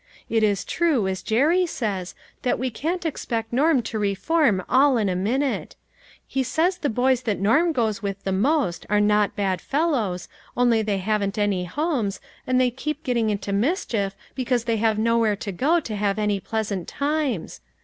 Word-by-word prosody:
It 225 -1 +3
is 205 -3 +1
true, 305 - +1
as 190 -1 -2
Jerry 310 - +2
says, 200 - -3 0.3
that 250 - +1
we 255 0 -2
can't 335 +9 -3
expect 230 -7 -3
Norm 280 0 +3
to 220 0 -4
reform 205 - +1
all 265 0 +4
in 210 -3 +1
a 180 - -1
minute. 255 +9 -1 0.5
He 270 - -1
says 330 +8 0
the 295 -4 0
boys 250 +2 +2
that 215 -5 -2
Norm 270 - +3
goes 225 -8 0
with 195 -1 -4
the 195 - -1
most 205 - 0
are 210 0 +3
not 210 0 +2
bad 190 -3 -1
fellows, 265 - -1 0.3
only 240 -2 +3
they 210 -2 -1
haven't 205 +1 -1
any 200 -3 0
homes, 250 - -1 0.3
and 255 0 +2
they 250 -1 +3
keep 305 +4 -4
getting 235 -6 +1
into 200 -1 -2
mischief, 210 - 0 0.2
because 250 -2 0
they 230 -1 0
have 220 0 +1
nowhere 225 -1 +2
to 200 0 -5
go 295 - +2
to 220 -9 -5
have 200 0 0
any 210 -2 0
pleasant 205 -3 -3
times. 280 - -2
225 Hz, 180 wpm, -24 LUFS, 200-275 Hz, 0.5 s, all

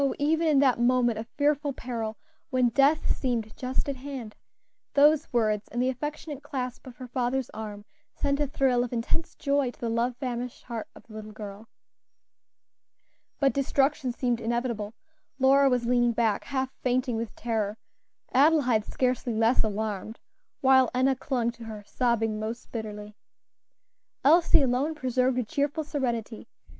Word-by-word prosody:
even 320 +3 +2
in 300 -3 +4
that 270 -3 +4
moment 240 -2 +3
of 225 - -6
fearful 290 0 +1
peril, 230 -4 -4 0.3
when 255 -2 +3
death 280 +6 +3
seemed 235 -5 -2
just 260 +3 -2
at 280 -2 -2
hand, 255 -5 -7 0.6
those 300 +2 +5
words, 215 -3 +1
and 240 - -4
the 255 +1 +2
affectionate 295 +2 -5
clasp 260 -3 -5
of 250 - -10
her 255 -1 -9
father's 250 +1 -1
arm, 210 -2 -7 0.3
sent 280 0 0
a 295 - +1
thrill 260 -3 +2
of 245 - -5
intense 245 +7 -2
joy 280 -2 +1
to - - -13
the 230 -1 -2
love 235 +2 0
famished 245 -1 -4
heart 230 -3 -5
of - - -14
the 220 - -15
little 215 0 -8
girl. 210 0 -9 1.7
But 275 -1 +3
destruction 275 -1 +1
seemed 240 -1 -1
inevitable. 230 -2 -2 0.4
Lora 270 +1 +5
was 250 -2 +1
leaning 240 0 +3
back, 225 -3 +1
half 265 -1 -2
fainting 250 -1 +1
with 225 0 -4
terror; 220 -2 -2 0.6
Adelaide 265 -6 +4
scarcely 250 -2 -1
less 225 +3 +3
alarmed, 215 0 -3 0.4
while 260 -2 +5
Enna 260 +1 +3
clung 245 -2 -1
to 235 -1 -12
her, 215 -2 -7
sobbing 225 -3 0
most 225 +2 -5
bitterly. 210 -2 -6 1.1
Elsie 320 0 +6
alone 270 +5 +1
preserved 255 -2 +1
a 250 - +1
cheerful 290 +5 -1
serenity. 240 -7 -3
250 Hz, 150 wpm, -27 LUFS, 225-275 Hz, 1.7 s, Elsie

